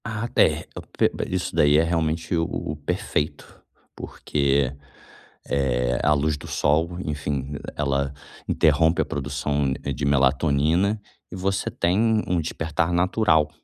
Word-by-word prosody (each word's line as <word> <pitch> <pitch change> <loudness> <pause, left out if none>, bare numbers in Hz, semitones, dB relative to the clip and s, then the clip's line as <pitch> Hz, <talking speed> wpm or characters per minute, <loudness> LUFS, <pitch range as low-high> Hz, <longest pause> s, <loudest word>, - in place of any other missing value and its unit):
Ah, 115 0 -3
é. 80 +1 +3
Eu - - -6
p - - 0
p - - -4
isso 90 -1 -2
daí 75 0 +5
é 80 - +4
realmente 80 0 -1
o 80 0 +1
o 75 - -4
perfeito, 75 0 -3 0.3
porque, 70 -2 0 0.8
eh, 60 -3 0
a 75 - +4
luz 75 +1 0
do - - -10
sol, 80 +4 +1
enfim, 75 -2 -3 0.2
ela 70 -1 -1 0.3
interrompe 80 +2 +3
a - - 0
produção, 70 0 -1
eh, - - -2
de 70 - -3
melatonina 75 +8 +2 0.3
e - - -8
você 95 +1 -1
tem 110 +5 +1
um 90 -1 0
despertar 80 +1 -1
natural, 85 -3 +2
75 Hz, 140 wpm, -24 LUFS, 70-85 Hz, 0.8 s, daí